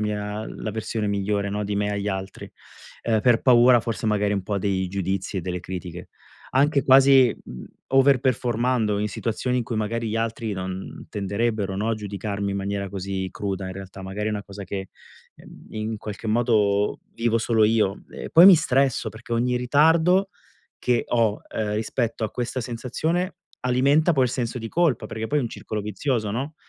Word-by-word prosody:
mia 105 Hz, 0 st, -3 dB
la 110 Hz, -, -5 dB
versione 110 Hz, 0 st, -3 dB
migliore, 100 Hz, 0 st, -1 dB
no, 105 Hz, +1 st, -2 dB
di 100 Hz, 0 st, -2 dB
me 105 Hz, 0 st, 0 dB
agli 100 Hz, 0 st, -3 dB
altri, 95 Hz, -1 st, -4 dB, 0.5 s
ehm, 110 Hz, -2 st, +1 dB
per 120 Hz, -3 st, +4 dB
paura 120 Hz, -1 st, +6 dB
forse 115 Hz, -1 st, -3 dB
magari 105 Hz, -1 st, +1 dB
un 100 Hz, -2 st, -3 dB
po' 100 Hz, 0 st, -2 dB
dei 95 Hz, -1 st, 0 dB
giudizi 95 Hz, +1 st, -2 dB
e -, -, -2 dB
delle 90 Hz, +1 st, -3 dB
critiche. 90 Hz, -1 st, -7 dB, 0.4 s
Anche 140 Hz, +2 st, +3 dB
quasi, 135 Hz, -2 st, +6 dB
mhmm, 65 Hz, -, -9 dB, 0.2 s
over 135 Hz, 0 st, +4 dB
performando 120 Hz, -3 st, +1 dB
in 105 Hz, +1 st, -1 dB
situazioni 125 Hz, +4 st, -2 dB
in -, -, 0 dB
cui 115 Hz, -, -4 dB
magari 115 Hz, +1 st, -2 dB
gli 110 Hz, -, -2 dB
altri 115 Hz, -1 st, -2 dB
non 95 Hz, 0 st, -6 dB
tenderebbero, 100 Hz, 0 st, -1 dB
no, 105 Hz, +3 st, -1 dB
a 115 Hz, -, +1 dB
giudicarmi 100 Hz, -1 st, -4 dB
in 100 Hz, -, -2 dB
maniera 100 Hz, 0 st, -3 dB
così 95 Hz, -1 st, -4 dB
cruda 100 Hz, -2 st, -3 dB
in 95 Hz, -, -5 dB
realtà, 95 Hz, 0 st, -9 dB
magari 95 Hz, +3 st, -4 dB
è -, -, -1 dB
una 105 Hz, -1 st, -4 dB
cosa 100 Hz, +1 st, -9 dB
che, 95 Hz, 0 st, -5 dB, 0.5 s
ehm, -, -, -15 dB
in 110 Hz, +1 st, -3 dB
qualche 105 Hz, +1 st, -7 dB
modo 105 Hz, -3 st, +2 dB
vivo 115 Hz, 0 st, +1 dB
solo 110 Hz, -1 st, +2 dB
io. 105 Hz, -3 st, +1 dB
E -, -, -8 dB
poi 170 Hz, +3 st, +8 dB
mi 195 Hz, -, +11 dB
stresso 135 Hz, -5 st, +1 dB
perché 115 Hz, +1 st, -9 dB
ogni 125 Hz, +1 st, +1 dB
ritardo 160 Hz, +9 st, +3 dB, 0.5 s
che 125 Hz, -1 st, +1 dB
ho, 115 Hz, -3 st, +1 dB
ehm, 105 Hz, -1 st, -2 dB
rispetto 115 Hz, +1 st, -2 dB
a 110 Hz, -, -3 dB
questa 125 Hz, +1 st, -3 dB
sensazione 155 Hz, -, -2 dB, 0.2 s
alimenta 140 Hz, +7 st, +3 dB
poi 135 Hz, -4 st, +3 dB
il 125 Hz, -, 0 dB
senso 125 Hz, 0 st, -2 dB
di 115 Hz, -1 st, -6 dB
colpa, 165 Hz, -6 st, +1 dB
perché 110 Hz, 0 st, -4 dB
poi 150 Hz, +5 st, +1 dB
è -, -, +1 dB
un 120 Hz, -, -2 dB
circolo 110 Hz, -1 st, -5 dB
vizioso, 105 Hz, +2 st, -2 dB
no, 135 Hz, +8 st, -3 dB
110 Hz, 185 wpm, -24 LUFS, 100-125 Hz, 0.5 s, mi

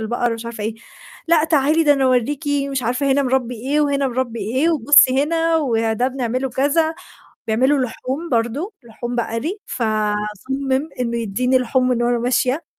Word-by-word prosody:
البقر،" 240 Hz, +2 st, -1 dB
ومش 230 Hz, 0 st, -6 dB
عارفة 225 Hz, -3 st, -6 dB
إيه، 220 Hz, 0 st, -2 dB, 0.5 s
"لأ 330 Hz, -2 st, +4 dB
تعالي 315 Hz, 0 st, +2 dB
ده 290 Hz, -, +6 dB
أنا 270 Hz, -1 st, 0 dB
أوريكِ 255 Hz, +4 st, +1 dB, 0.3 s
مش 265 Hz, -2 st, -2 dB
عارفة 270 Hz, +3 st, +1 dB
هنا 280 Hz, -, +2 dB
مربي، 255 Hz, -2 st, 0 dB
إيه، 270 Hz, +6 st, -1 dB
وهنا 280 Hz, -2 st, +1 dB
مربي 240 Hz, -2 st, -3 dB
إيه، 265 Hz, +9 st, +1 dB
وبُصّي 275 Hz, -2 st, +5 dB
هنا 330 Hz, +1 st, +1 dB
وده 230 Hz, -4 st, 0 dB
بنعمله 255 Hz, 0 st, -2 dB
كذا." 305 Hz, +5 st, +1 dB, 0.5 s
بيعملوا 260 Hz, +6 st, +2 dB
لحوم 265 Hz, +8 st, -5 dB
برضه، 245 Hz, -, -1 dB
لحوم 240 Hz, +1 st, -6 dB
بقري، 235 Hz, -, -2 dB
فصمّم 220 Hz, +6 st, -2 dB
إنه 235 Hz, -1 st, -1 dB
يدّيني 250 Hz, +4 st, +1 dB
لحوم 255 Hz, +1 st, +1 dB
من 240 Hz, -1 st, +1 dB
وأنا 240 Hz, 0 st, +1 dB
ماشية. 255 Hz, +5 st, 0 dB
255 Hz, 160 wpm, -20 LUFS, 235-285 Hz, 0.5 s, ده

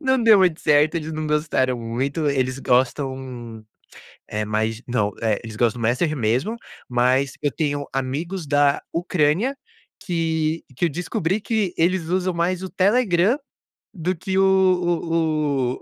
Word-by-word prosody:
não 265 Hz, -4 st, +2 dB
deu 220 Hz, -3 st, +7 dB
muito 180 Hz, -4 st, +3 dB
certo, 150 Hz, +2 st, +3 dB
eles 160 Hz, 0 st, -4 dB
não 155 Hz, 0 st, -3 dB
gostaram 150 Hz, -5 st, 0 dB
muito. 135 Hz, +7 st, -2 dB
Eles 130 Hz, -1 st, 0 dB
gostam, 125 Hz, -3 st, -1 dB, 0.7 s
eh, 105 Hz, 0 st, -2 dB
mais 110 Hz, +2 st, -1 dB
não, 110 Hz, -4 st, 0 dB, 0.3 s
eles 110 Hz, -1 st, -8 dB
gostam 120 Hz, 0 st, +1 dB
do -, -, -2 dB
messenger 135 Hz, +7 st, +1 dB
mesmo, 125 Hz, -, 0 dB, 0.3 s
mas 125 Hz, +3 st, +2 dB
eu 145 Hz, -, 0 dB
tenho 145 Hz, -2 st, -2 dB
amigos 150 Hz, +6 st, -3 dB
da 145 Hz, -1 st, +3 dB
Ucrânia 175 Hz, -, +1 dB, 0.4 s
que 165 Hz, -2 st, -1 dB
que 175 Hz, -, +1 dB
eu -, -, +1 dB
descobri 175 Hz, +4 st, -2 dB
que 210 Hz, -6 st, -1 dB
eles 175 Hz, +2 st, +2 dB
usam 185 Hz, 0 st, 0 dB
mais 175 Hz, +2 st, 0 dB
o 190 Hz, -, -5 dB
Telegram 200 Hz, +2 st, +2 dB, 0.6 s
do 180 Hz, 0 st, -2 dB
que 190 Hz, +3 st, -3 dB
o 165 Hz, -8 st, +1 dB
155 Hz, 140 wpm, -22 LUFS, 130-180 Hz, 0.7 s, deu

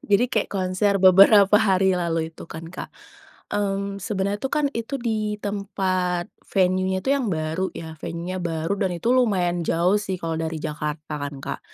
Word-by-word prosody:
Jadi, 205 Hz, +4 st, +3 dB
kayak 215 Hz, -, +1 dB
konser 190 Hz, +1 st, +1 dB
beberapa 195 Hz, +2 st, +7 dB
hari 190 Hz, -2 st, +3 dB
lalu 165 Hz, -2 st, -1 dB
itu 165 Hz, -, -12 dB
kan 160 Hz, +1 st, -8 dB
Kak. 180 Hz, -, -7 dB, 0.6 s
Mmm, 200 Hz, -1 st, -1 dB
sebenernya 200 Hz, 0 st, -2 dB
tuh 270 Hz, -, -2 dB
kan, 300 Hz, -1 st, +2 dB
itu 230 Hz, +4 st, -3 dB
di 215 Hz, -4 st, -2 dB
tempat 190 Hz, -3 st, -2 dB, 0.2 s
venue-nya 185 Hz, 0 st, +1 dB
tuh 270 Hz, -, +2 dB
yang 275 Hz, -3 st, 0 dB
baru 160 Hz, +2 st, -1 dB
ya, 160 Hz, -1 st, -7 dB
venue-nya 175 Hz, +2 st, -4 dB
baru, 165 Hz, 0 st, -2 dB
dan 185 Hz, -3 st, 0 dB
itu 230 Hz, +8 st, +1 dB
lumayan 190 Hz, -9 st, +2 dB
jauh 180 Hz, +5 st, +2 dB
sih 195 Hz, -3 st, -3 dB
kalau 165 Hz, -2 st, -3 dB
dari 160 Hz, 0 st, -3 dB
Jakarta 150 Hz, 0 st, -4 dB
kan 145 Hz, 0 st, -4 dB
Kak. -, -, -4 dB
185 Hz, 170 wpm, -23 LUFS, 170-205 Hz, 0.6 s, beberapa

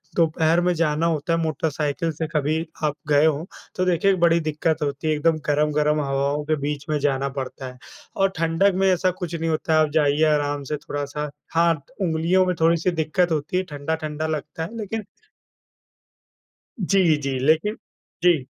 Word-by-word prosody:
दोपहर 165 Hz, 0 st, +2 dB
में 180 Hz, 0 st, +2 dB
जाना 160 Hz, -1 st, +1 dB
होता 165 Hz, 0 st, 0 dB
है 165 Hz, -, +1 dB
मोटरसाइकिल 155 Hz, +1 st, -1 dB
से 160 Hz, +1 st, -4 dB
कभी 150 Hz, +2 st, +1 dB, 0.3 s
आप 150 Hz, -1 st, +1 dB
गए 145 Hz, 0 st, +4 dB
हो, 160 Hz, +2 st, 0 dB, 0.3 s
तो 185 Hz, -, 0 dB
देखिए 185 Hz, +2 st, +3 dB
बड़ी 170 Hz, 0 st, +4 dB
दिक्कत 155 Hz, 0 st, -1 dB
होती 140 Hz, +2 st, -3 dB
है, 155 Hz, -, +3 dB
एकदम 155 Hz, +1 st, +2 dB
गरम-गरम 150 Hz, 0 st, +2 dB
हवाओं 140 Hz, +1 st, -1 dB
के 155 Hz, +1 st, +1 dB
बीच 145 Hz, -1 st, -4 dB
में 155 Hz, -, +1 dB
जाना 140 Hz, -1 st, 0 dB
पड़ता 130 Hz, 0 st, -6 dB
है। 125 Hz, -, -10 dB, 0.4 s
और 195 Hz, 0 st, +3 dB
ठंडक 165 Hz, +4 st, +2 dB
में 190 Hz, +1 st, +2 dB
ऐसा 185 Hz, +1 st, +2 dB
कुछ 175 Hz, -2 st, -5 dB
नहीं 165 Hz, 0 st, -2 dB
होता 160 Hz, +1 st, 0 dB
है, 155 Hz, -, +5 dB
आप 155 Hz, -1 st, +3 dB
जाइए 150 Hz, -1 st, +3 dB
आराम 145 Hz, -1 st, -1 dB
से 150 Hz, +2 st, -3 dB
थोड़ा-सा 145 Hz, +1 st, -4 dB, 0.2 s
हाँ, 170 Hz, 0 st, +4 dB
त -, -, -25 dB
उंगलियों 170 Hz, +2 st, +2 dB
में 180 Hz, -1 st, 0 dB
थोड़ी-सी 165 Hz, +2 st, +3 dB
दिक्कत 165 Hz, +2 st, 0 dB
होती 155 Hz, +3 st, -1 dB
है, 185 Hz, -, +1 dB
ठंडा-ठंडा 155 Hz, 0 st, -3 dB
लगता 155 Hz, +1 st, -4 dB
है 230 Hz, +7 st, -7 dB
लेकिन 220 Hz, +1 st, -4 dB, 1.8 s
जी, 185 Hz, -4 st, +3 dB
जी, 135 Hz, -2 st, -2 dB
लेकिन 160 Hz, +10 st, +2 dB, 0.5 s
जी। 165 Hz, -7 st, +4 dB
155 Hz, 175 wpm, -23 LUFS, 150-170 Hz, 1.8 s, है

